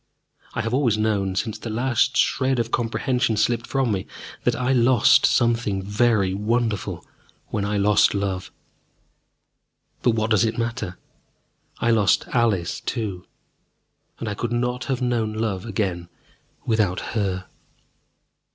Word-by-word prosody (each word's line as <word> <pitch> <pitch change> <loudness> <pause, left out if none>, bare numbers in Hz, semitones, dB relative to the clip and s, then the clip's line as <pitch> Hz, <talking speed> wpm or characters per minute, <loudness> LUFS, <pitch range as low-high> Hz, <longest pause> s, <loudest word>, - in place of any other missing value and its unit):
I 120 - 0
have 115 +1 -3
always 125 -5 +2
known, 100 -3 0
since 110 +3 -2
the 115 - -6
last 120 +2 +1
shred 130 -1 +2
of 115 -1 -1
comprehension 120 0 0
slipped 115 +2 +1
from 135 -4 0
me, 95 -2 -2 0.4
that - - +2
I 125 +1 0
lost 120 -2 +5
something 115 -5 +1
very 105 -2 +2
wonderful 110 0 -1 0.4
when 100 -1 -2
I 105 0 -1
lost 100 +1 +4
love. 95 -2 -2 1.5
But 120 -2 +2
what 110 0 -1
does 110 -1 +4
it 110 -1 -1
matter? 115 -6 -3 0.8
I 120 - +1
lost 105 -5 +3
Alice 110 -8 +1
too, 100 -7 -4 0.9
and 115 - -5
I 105 - -2
could 120 +3 -3
not 125 +1 -1
have 130 -2 -2
known 115 -3 0
love 110 -2 -2
again 95 -5 -2 0.6
without 105 -5 +1
her. 95 -4 -1
110 Hz, 135 wpm, -23 LUFS, 100-120 Hz, 1.5 s, lost